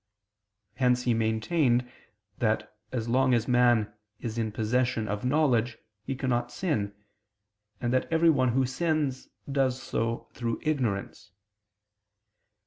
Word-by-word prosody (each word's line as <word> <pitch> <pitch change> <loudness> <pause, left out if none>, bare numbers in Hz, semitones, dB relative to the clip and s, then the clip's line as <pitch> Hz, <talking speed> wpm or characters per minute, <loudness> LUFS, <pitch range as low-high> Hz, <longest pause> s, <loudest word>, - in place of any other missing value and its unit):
Hence 125 -1 +2
he 120 - +2
maintained 120 +3 +1 0.5
that 110 -2 0 0.2
as 120 -3 -2
long 130 +1 +3
as 115 -1 0
man 120 -4 +3 0.3
is 115 0 -4
in 110 -1 -1
possession 115 +1 0
of 105 0 -3
knowledge, 125 -4 +2 0.2
he 135 +4 -4
cannot 120 -2 -1
sin; 105 - -2 0.8
and 120 0 -1
that 130 - 0
every 165 0 +5
one 130 -5 +2
who 130 +1 +3
sins, 145 -1 -1 0.2
does 130 -2 +1
so 115 -2 -2
through 115 -2 -3
ignorance. 120 - -2
125 Hz, 125 wpm, -28 LUFS, 115-130 Hz, 0.8 s, every